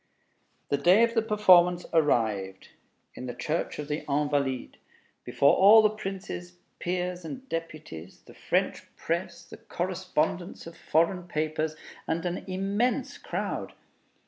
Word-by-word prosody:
The 140 - +1
day 180 +10 +5
of 235 0 +2
the 225 - +3
performance 185 -5 +4
arrived, 110 - +1 0.4
in 125 - -7
the 120 - -5
Church 155 +6 -2
of 150 - -5
the 150 +1 -3
Invalides, 140 -2 -1 0.5
before 140 - +3
all 215 +3 +8
the 215 - +4
princes, 185 - -7 0.2
peers, 180 0 -2
and 260 +11 -8
deputies, 155 - -7
the - - -16
French - - -1
press, 170 +1 -3
the - - -12
correspondents 185 -5 -3
of 165 0 -10
foreign 170 +3 0
papers, 155 -1 -2 0.3
and 165 +1 -1
an 175 +1 -3
immense 200 +6 -1
crowd. - - -4
170 Hz, 130 wpm, -27 LUFS, 150-190 Hz, 0.5 s, all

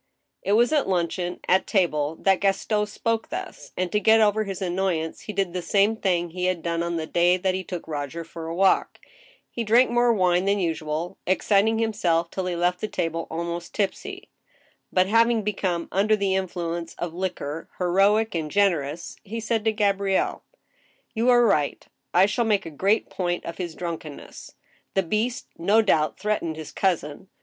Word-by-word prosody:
It 200 - 0
was 240 +7 +4
at 290 -9 +2
luncheon, 175 0 -1
at 190 +1 +3
table, 160 -6 +1
that 195 -1 +3
Gaston 210 +2 +1
spoke 225 +2 -2
thus, - - -7
and 180 -1 -1
to 210 - +2
get 220 +1 +5
over 215 0 +3
his 195 -2 -5
annoyance 180 -3 -1
he - - -6
did 195 -3 -1
the 180 - -2
same 200 +5 +2
thing 175 -5 0
he 180 +1 -3
had 180 -3 -1
done 170 -1 -1
on 170 0 -2
the 160 -1 -2
day 175 +2 +3
that 185 0 0
he 185 0 -3
took 180 -2 -6
Roger 150 +1 -4
for 165 0 -8
a 165 - -4
walk 190 +1 +2 0.3
— - - -30
he 235 - -3
drank 235 +3 +4
more 240 0 +4
wine 185 -3 +2
than 200 +1 +2
usual, 160 -1 -3
exciting 200 +4 +3
himself 180 -7 0
till 190 -1 -3
he 180 - -2
left 180 +1 0
the 215 - -1
table 165 -4 -3
almost 170 +1 -5
tipsy; 385 - -3 0.6
but, 185 0 +3
having 230 +2 +3
become 190 -4 -1
undo 210 +3 +3
the 200 -2 0
influence 170 -3 -3
of 175 -2 -4
liquor 165 -4 -4
heroic 200 +5 +3
and 160 -3 -2
generous, 170 -5 0
he 225 +2 -6
said 225 -1 -1
to 220 - +4
Gabrielle: 200 -2 0 0.4
" - - -38
You 230 +2 +1
are 240 -1 +6
right. 150 -9 +1 0.2
I 180 +2 +5
shall 220 +4 0
make 205 -4 +1
a 165 - -6
great 195 +8 +1
point 175 -1 -2
of 170 - -7
his 170 -3 -4
drunkenness. 165 -4 -7 0.4
The 195 - +3
beast, 215 +7 -1
no 205 +6 +4
doubt, 155 -7 +2
threatened 200 -6 -1
his 155 -1 -8
cousin. 175 -2 -1
185 Hz, 185 wpm, -24 LUFS, 170-210 Hz, 0.6 s, are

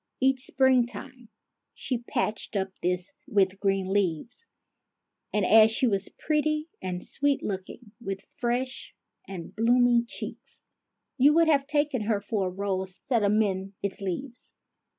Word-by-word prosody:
Each 265 0 +2
springtime 250 -2 +1 0.5
she 250 -3 -2
patched 235 -3 -3
up 195 -1 0
this 180 +6 -1
with 195 -5 +2
green 195 -1 0
leaves; 205 - -1 0.8
and, 210 -2 +1
as 220 +2 +7
she 225 +4 +1
was 200 -4 0
pretty 305 0 0
and 180 -1 -4
sweet 285 -1 0
looking, 205 +3 -6
with 195 -2 -4 0.2
fresh 250 +2 -2 0.3
and 185 0 -8
blooming 240 +1 +4
cheeks, - - -8 0.6
you 290 +4 +6
would 330 -1 +5
have 280 -3 +3
taken 290 -4 +1
her 210 -1 0
for 200 -1 -1
a - - -3
rose 190 -1 -3
set 240 -4 +1
amid 200 -2 +1
its 200 0 -3
leaves. 235 +7 -5
220 Hz, 135 wpm, -27 LUFS, 195-260 Hz, 0.8 s, as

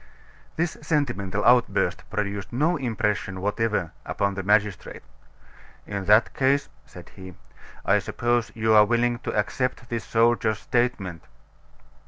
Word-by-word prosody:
This 165 0 -1
sentimental 105 - -1
outburst 125 0 +2
produced 100 -1 -3
no 150 +8 +1
impression 105 -7 -2
whatever 105 -3 -1
upon 100 0 -1
the 95 - -4
magistrate. 105 -1 0 0.8
"In 100 -2 -5
that 105 +4 +4
case," 140 +1 +1 0.2
said - - -13
he, 95 -2 -12 0.5
"I - - +4
suppose 120 -1 -1
you 110 0 +2
are 105 -1 +8
willing 120 +2 +1
to - - -4
accept 125 +3 -2
this 115 -1 -3
soldier's 115 -2 +2
statement." 110 -10 -2
110 Hz, 125 wpm, -25 LUFS, 100-120 Hz, 0.8 s, are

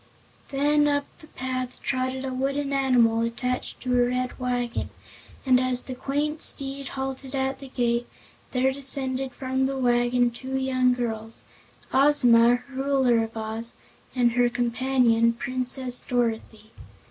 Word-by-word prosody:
Then 295 +1 +2
up 285 -1 +1
the 310 - -13
path 255 -2 -4
trotted 260 0 -2
a 260 - -3
wooden 275 +2 -1
animal 245 -4 +3
attached 250 +2 -3
to 250 -1 -1
a - - +1
red 250 +1 -2
wagon, 245 -1 -2 0.6
and 255 -1 +5
as 255 -1 0
the 260 - -6
quaint 295 +4 -2
steed 275 0 0
halted 265 0 -4
at 265 0 -1
the 275 - -9
gate 240 -2 -1 0.4
there 260 +1 +2
descended 265 -1 0
from 260 +1 -1
the 270 0 -3
wagon 245 -1 +2
two 260 +3 -6
young 255 -1 +2
girls, 225 -2 -5 0.5
Ozma, 245 -3 +5
Ruler 265 -3 +2
of 225 0 -7
Oz, 220 +1 -4 0.4
and 245 -2 +3
her 245 0 +3
companion, 240 -1 +2
Princess 255 +1 -2
Dorothy. 225 -3 -2
255 Hz, 135 wpm, -25 LUFS, 240-265 Hz, 0.6 s, and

